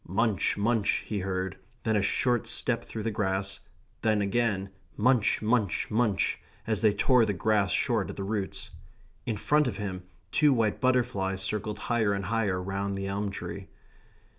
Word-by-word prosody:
Munch, 100 Hz, +1 st, +1 dB
munch, 105 Hz, 0 st, +1 dB
he 105 Hz, -, -2 dB
heard; 95 Hz, -1 st, -2 dB, 0.3 s
then 110 Hz, -1 st, +1 dB
a 105 Hz, -, +3 dB
short 120 Hz, +3 st, +1 dB
step -, -, 0 dB
through 110 Hz, -, -6 dB
the 115 Hz, -, -1 dB
grass; 95 Hz, -2 st, -1 dB, 0.4 s
then 110 Hz, -1 st, +2 dB
again 100 Hz, -2 st, 0 dB, 0.3 s
munch, 115 Hz, -1 st, +3 dB
munch, 110 Hz, -4 st, +1 dB
munch, 110 Hz, -3 st, +1 dB, 0.3 s
as 110 Hz, -2 st, -1 dB
they 110 Hz, -2 st, +5 dB
tore 125 Hz, +3 st, +4 dB
the 105 Hz, -, +1 dB
grass 105 Hz, 0 st, +2 dB
short -, -, +1 dB
at -, -, -6 dB
the 100 Hz, -, -4 dB
roots. 100 Hz, -1 st, -3 dB, 0.6 s
In 110 Hz, -, -1 dB
front 150 Hz, +6 st, +3 dB
of 105 Hz, -6 st, -3 dB
him 95 Hz, -3 st, -4 dB, 0.3 s
two 150 Hz, -2 st, +4 dB
white 110 Hz, -4 st, +1 dB
butterflies 100 Hz, -7 st, +1 dB
circled 105 Hz, +1 st, -2 dB
higher 110 Hz, -2 st, +1 dB
and 100 Hz, -1 st, -2 dB
higher 105 Hz, -4 st, 0 dB
round 100 Hz, +1 st, -2 dB
the 95 Hz, 0 st, -3 dB
elm 100 Hz, +1 st, -2 dB
tree. 95 Hz, 0 st, -6 dB
105 Hz, 165 wpm, -28 LUFS, 95-115 Hz, 0.6 s, they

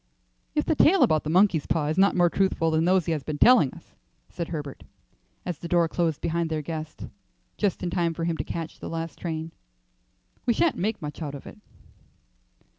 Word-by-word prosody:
"If 300 Hz, -, +1 dB
the -, -, +2 dB
tale 335 Hz, +5 st, +5 dB
about 155 Hz, -1 st, +3 dB
the -, -, -2 dB
monkey's 180 Hz, -2 st, +3 dB
paw 160 Hz, -3 st, 0 dB
is 155 Hz, +3 st, -1 dB
not 200 Hz, +1 st, +4 dB
more 175 Hz, -1 st, +4 dB
truthful 170 Hz, -3 st, +1 dB
than 160 Hz, +1 st, +2 dB
those 185 Hz, -1 st, +3 dB
he -, -, -1 dB
has 155 Hz, -2 st, -1 dB
been 150 Hz, +1 st, -5 dB
telling 175 Hz, -, +6 dB
us," -, -, -16 dB, 0.4 s
said 170 Hz, -, -5 dB
Herbert, 145 Hz, -4 st, -6 dB, 0.6 s
as 175 Hz, -4 st, -4 dB
the 170 Hz, -, -6 dB
door 170 Hz, -1 st, +3 dB
closed 165 Hz, -2 st, -1 dB
behind 170 Hz, 0 st, -1 dB
their 155 Hz, -1 st, -2 dB
guest, 155 Hz, 0 st, -6 dB, 0.5 s
just 205 Hz, -4 st, -1 dB
in 175 Hz, -, -2 dB
time 170 Hz, -2 st, 0 dB
for 165 Hz, -, -4 dB
him 165 Hz, 0 st, 0 dB
to -, -, -2 dB
catch 165 Hz, -1 st, -6 dB
the -, -, -7 dB
last 165 Hz, -1 st, -5 dB
train, 160 Hz, -1 st, -4 dB, 1.0 s
"we 235 Hz, -, +3 dB
sha'nt 330 Hz, +4 st, +2 dB
make 210 Hz, -1 st, -2 dB
much 150 Hz, +2 st, -6 dB
out 145 Hz, -2 st, -4 dB
of 140 Hz, -, -10 dB
it." 215 Hz, -, -11 dB
165 Hz, 205 wpm, -26 LUFS, 155-180 Hz, 1.0 s, telling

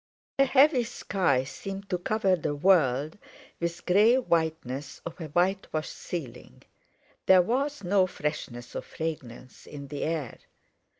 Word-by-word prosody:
A 275 Hz, -, +7 dB
heavy 270 Hz, 0 st, +5 dB
sky 185 Hz, -, 0 dB
seemed 195 Hz, +8 st, -7 dB
to 180 Hz, -, 0 dB
cover 195 Hz, 0 st, +1 dB
the 150 Hz, -3 st, -3 dB
world 150 Hz, -2 st, +2 dB, 0.4 s
with 170 Hz, 0 st, -2 dB
the -, -, -17 dB
grey 215 Hz, +5 st, +6 dB
whiteness 160 Hz, -, -1 dB
of 170 Hz, +1 st, -7 dB
a 160 Hz, -, -4 dB
whitewashed 175 Hz, -1 st, -1 dB
ceiling. 150 Hz, -10 st, -7 dB, 0.6 s
There 185 Hz, -1 st, +7 dB
was 275 Hz, +6 st, -1 dB
no 185 Hz, +1 st, +3 dB
freshness 140 Hz, -7 st, -5 dB
or -, -, -2 dB
fragrance 130 Hz, -7 st, -7 dB
in 140 Hz, -2 st, -9 dB
the 145 Hz, 0 st, -5 dB
air. 155 Hz, -7 st, -3 dB
170 Hz, 135 wpm, -28 LUFS, 145-195 Hz, 0.6 s, A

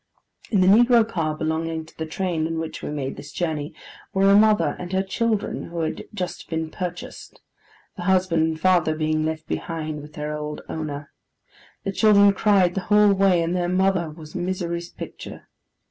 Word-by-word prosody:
In 200 Hz, -4 st, +2 dB
the 185 Hz, -, +4 dB
negro 235 Hz, +2 st, +6 dB
car 160 Hz, -7 st, -2 dB
belonging 160 Hz, 0 st, -2 dB
to 160 Hz, -, -19 dB
the 160 Hz, -, -5 dB
train 165 Hz, -1 st, -1 dB
in 165 Hz, 0 st, -3 dB
which 160 Hz, 0 st, -5 dB
we -, -, -5 dB
made 140 Hz, -3 st, -4 dB
this 145 Hz, -, -9 dB
journey, 155 Hz, -1 st, -3 dB, 0.4 s
were 195 Hz, +1 st, +5 dB
a -, -, +7 dB
mother 215 Hz, 0 st, +4 dB
and 180 Hz, 0 st, -6 dB
her 190 Hz, 0 st, +2 dB
children 220 Hz, +1 st, -1 dB
who 170 Hz, 0 st, -5 dB
had 160 Hz, -, -3 dB
just 180 Hz, -4 st, -5 dB
been 160 Hz, -1 st, -3 dB
purchased; 180 Hz, -1 st, -7 dB, 0.6 s
the -, -, -5 dB
husband 180 Hz, -3 st, +2 dB
and 160 Hz, -1 st, -3 dB
father 175 Hz, -3 st, +3 dB
being 155 Hz, 0 st, 0 dB
left 160 Hz, 0 st, -3 dB
behind 155 Hz, -2 st, -4 dB
with 150 Hz, +1 st, -12 dB
their 150 Hz, 0 st, -4 dB
old 150 Hz, 0 st, -5 dB
owner. 150 Hz, -2 st, -5 dB, 0.7 s
The 195 Hz, -, -2 dB
children 200 Hz, 0 st, +5 dB
cried 195 Hz, -3 st, +3 dB
the 195 Hz, -, -2 dB
whole 210 Hz, -1 st, +6 dB
way, 190 Hz, -3 st, +3 dB
and 170 Hz, +2 st, -1 dB
the 175 Hz, -1 st, 0 dB
mother 185 Hz, -2 st, +1 dB
was 155 Hz, 0 st, -11 dB
misery's 175 Hz, -1 st, -3 dB
picture. -, -, -9 dB
170 Hz, 180 wpm, -23 LUFS, 155-190 Hz, 0.7 s, a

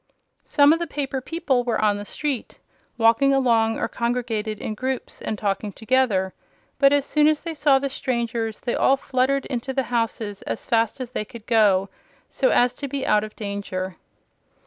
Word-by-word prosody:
Some 285 Hz, 0 st, +5 dB
of 330 Hz, -, 0 dB
the 340 Hz, -, -2 dB
paper 275 Hz, -3 st, -3 dB
people 275 Hz, -4 st, 0 dB
were 235 Hz, -3 st, -1 dB
on 210 Hz, -1 st, +2 dB
the 205 Hz, -, -6 dB
street, 280 Hz, +1 st, -4 dB, 0.4 s
walking 240 Hz, +4 st, +4 dB
along 230 Hz, -4 st, +2 dB
or -, -, -1 dB
congregated 230 Hz, -3 st, -2 dB
in 215 Hz, -, -4 dB
groups 260 Hz, +4 st, -4 dB
and 215 Hz, -, -3 dB
talking 205 Hz, 0 st, -2 dB
together; 220 Hz, -4 st, +1 dB, 0.5 s
but 275 Hz, -1 st, +6 dB
as 285 Hz, -1 st, +2 dB
soon 300 Hz, 0 st, +3 dB
as 305 Hz, -1 st, +2 dB
they 335 Hz, -1 st, -5 dB
saw 290 Hz, -3 st, +4 dB
the 275 Hz, +1 st, -1 dB
strangers 235 Hz, -5 st, -2 dB
they 240 Hz, -, -2 dB
all 270 Hz, -, +3 dB
fluttered 265 Hz, +1 st, 0 dB
into 260 Hz, 0 st, -3 dB
the 265 Hz, 0 st, 0 dB
houses 225 Hz, -3 st, -1 dB
as -, -, -5 dB
fast 230 Hz, +1 st, +1 dB
as 250 Hz, -1 st, -6 dB
they 210 Hz, -, -2 dB
could 225 Hz, 0 st, -12 dB
go, 205 Hz, -5 st, +3 dB, 0.4 s
so -, -, +1 dB
as 245 Hz, -, +3 dB
to 280 Hz, -, -6 dB
be 275 Hz, 0 st, -3 dB
out 210 Hz, 0 st, +3 dB
of 215 Hz, 0 st, -8 dB
danger. 195 Hz, -3 st, -4 dB
240 Hz, 185 wpm, -23 LUFS, 215-275 Hz, 0.5 s, but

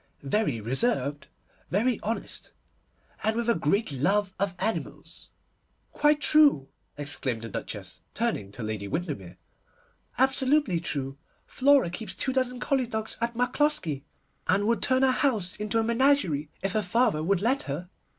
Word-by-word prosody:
Very 140 Hz, -, 0 dB
reserved, 140 Hz, -, 0 dB, 0.4 s
very 230 Hz, +6 st, +1 dB
honest, 225 Hz, +2 st, -4 dB, 0.7 s
and 220 Hz, 0 st, +1 dB
with 235 Hz, 0 st, -1 dB
a 235 Hz, -, +5 dB
great 170 Hz, +5 st, 0 dB
love 190 Hz, +8 st, +1 dB
of 195 Hz, -2 st, 0 dB
animals.' 220 Hz, +4 st, -4 dB, 0.6 s
'Quite 295 Hz, 0 st, +3 dB
true!' 290 Hz, -, +4 dB, 0.3 s
exclaimed 135 Hz, -5 st, -2 dB
the 115 Hz, -, -6 dB
Duchess, -, -, -6 dB
turning 100 Hz, -1 st, -1 dB
to 120 Hz, -, -7 dB
Lady 105 Hz, -2 st, -4 dB
Windermere, 100 Hz, -, -4 dB, 0.8 s
'absolutely 265 Hz, -, +3 dB
true! 140 Hz, -4 st, -4 dB, 0.3 s
Flora 270 Hz, -8 st, +3 dB
keeps 215 Hz, +5 st, -5 dB
two 260 Hz, -, -1 dB
dozen 255 Hz, -1 st, 0 dB
collie 260 Hz, -1 st, 0 dB
dogs 220 Hz, -1 st, -3 dB
at 235 Hz, 0 st, -1 dB
Macloskie, 245 Hz, -, 0 dB, 0.4 s
and 200 Hz, +2 st, +2 dB
would 230 Hz, +1 st, +1 dB
turn 260 Hz, 0 st, +2 dB
our 265 Hz, -, +5 dB
town -, -, -3 dB
house 215 Hz, -10 st, +1 dB
into 210 Hz, +2 st, -1 dB
a 225 Hz, -, +3 dB
menagerie 230 Hz, -, +2 dB
if 195 Hz, -, 0 dB
her 215 Hz, -, +1 dB
father 210 Hz, -3 st, +2 dB
would 185 Hz, +3 st, +1 dB
let 260 Hz, +5 st, +2 dB
her. 175 Hz, +7 st, -5 dB
210 Hz, 150 wpm, -27 LUFS, -, 0.8 s, a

